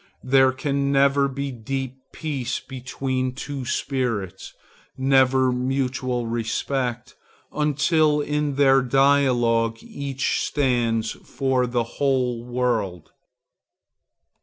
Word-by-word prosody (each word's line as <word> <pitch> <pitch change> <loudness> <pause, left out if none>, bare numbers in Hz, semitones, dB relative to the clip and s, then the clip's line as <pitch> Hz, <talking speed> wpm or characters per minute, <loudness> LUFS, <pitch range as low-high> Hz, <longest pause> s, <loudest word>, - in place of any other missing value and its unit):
There 130 0 +4
can 140 +1 -1
never 140 0 +3
be 140 +1 -4
deep 130 +2 -5
peace 135 -6 -3
between 130 0 -3
two 135 -1 -5
spirits, 115 -8 -2 0.5
never 130 -1 +3
mutual 130 -1 -1
respect, 120 +2 -2 0.4
until 150 +1 +2
in 150 -1 -1
their 135 -1 +5
dialogue 125 -4 +2
each 135 -1 -2
stands 120 -5 0
for 130 -2 -1
the 120 -1 0
whole 125 -1 -1
world. 120 -8 -2
130 Hz, 90 wpm, -23 LUFS, 120-140 Hz, 0.5 s, their